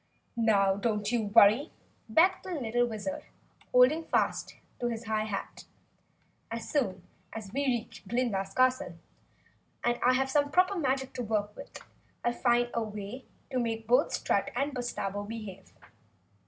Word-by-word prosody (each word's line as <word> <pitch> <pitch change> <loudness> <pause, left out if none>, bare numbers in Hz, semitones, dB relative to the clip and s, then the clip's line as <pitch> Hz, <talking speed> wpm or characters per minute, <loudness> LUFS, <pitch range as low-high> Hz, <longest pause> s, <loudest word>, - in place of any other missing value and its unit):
"Now, 200 -4 +3
don't 210 0 -1
you 235 -3 +1
worry," 215 - +5 0.4
begged 355 +11 +4
the 245 -9 0
Wizard, 205 -4 -4 0.5
holding 255 +6 +5
fast - - 0 0.2
to 240 - 0
his 230 -1 -3
high 215 -1 0
hat, 205 -2 -5 0.8
"As 230 0 -5
soon 265 -11 -1 0.3
as 220 -3 -7
we 280 +1 0
reach 240 -3 -3
Glinda's 220 -6 -1
castle 255 +4 +1 0.9
and 240 0 +1
I 250 - +5
have 265 +1 +1
some 285 0 +2
proper 365 +5 +3
magic 265 -5 -1
to - - -4
work 210 -2 -1
with, 280 - -10 0.5
I'll 240 - +2
find 240 0 +2
a 235 - 0
way 215 +3 -6 0.3
to 255 - 0
make 225 -2 -2
both 250 +5 +3
Strut - - 0
and 285 +1 -1
Bustabo 205 -5 -3
behave. 210 -4 -8
240 Hz, 145 wpm, -30 LUFS, 215-260 Hz, 0.9 s, worry